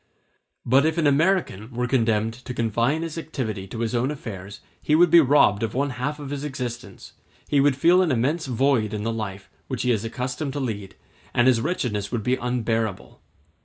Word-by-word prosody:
But 130 +3 +4
if 160 +1 0
an 165 - +1
American 145 - +1
were 125 +1 0
condemned 115 -3 +1
to 125 +1 -8
confine 120 +7 0
his 165 0 -5
activity 110 -11 -4
to 115 +4 -6
his 115 0 -1
own 125 +2 +1
affairs, 105 -9 -7 0.2
he 150 - +2
would 175 0 +5
be 170 - +9
robbed 130 -8 +4
of 115 0 -2
one 140 +1 0
half 130 +5 -3
of 145 -1 -7
his 145 0 -4
existence; 120 -7 -6 0.3
he 145 - +2
would 140 -1 +4
feel 175 +7 +4
an 175 -5 +1
immense 140 +6 0
void 125 -4 +1
in 105 - -4
the 115 +1 -1
life 100 -4 -5 0.2
which 125 +2 -3
he 125 - +2
is 110 -2 0
accustomed 125 +5 -4
to 145 - -3
lead, 105 -7 -4 0.4
and 120 - +4
his 125 -3 +4
wretchedness 115 - -2
would 120 -3 -2
be 125 +3 +1
unbearable. 115 -5 -2
125 Hz, 200 wpm, -24 LUFS, 110-145 Hz, 0.4 s, be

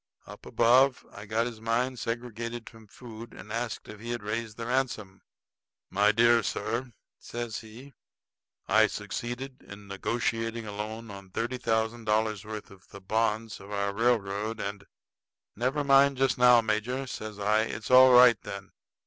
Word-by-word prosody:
Up - - -12
above 125 +3 +4
I 100 +1 -10
got 110 +2 +1
his 115 -2 -6
mind 120 +3 0
segregated 115 0 -5
from 115 -2 -13
food 115 +1 -11
and 105 - -9
asked 115 -1 -4
if 105 - -10
he 115 +2 -8
had 120 -2 -3
raised 110 +1 -4
the 115 - -5
ransom. 120 -6 -2 0.7
"My 105 +2 +4
dear 115 +1 +5
sir," 115 +5 -3 0.3
says 120 -2 -5
he, 120 +6 -13 0.7
"I 110 +2 +5
succeeded 120 +6 -6
in 100 0 -12
negotiating 115 +3 -2
a 105 - -6
loan 110 +2 -6
on 100 -1 -11
thirty 120 +6 -3
thousand 115 -1 -1
dollars' 110 -1 +1
worth 105 -1 -8
of 95 -1 -17
the 100 - -11
bonds 110 +2 -1
of 100 - -12
our 100 -1 -1
railroad, 110 -1 0
and 100 -1 -5 0.4
" - - -63
"Never 130 +6 0
mind 140 0 +5
just 135 0 +2
now, 125 -1 +6
major," 115 +5 -1
says 110 -4 -7
I. 105 +1 +2
"It's 110 +1 -6
all 130 0 +9
right, 125 -3 +7
then. 100 0 -8
115 Hz, 165 wpm, -28 LUFS, 105-120 Hz, 0.7 s, all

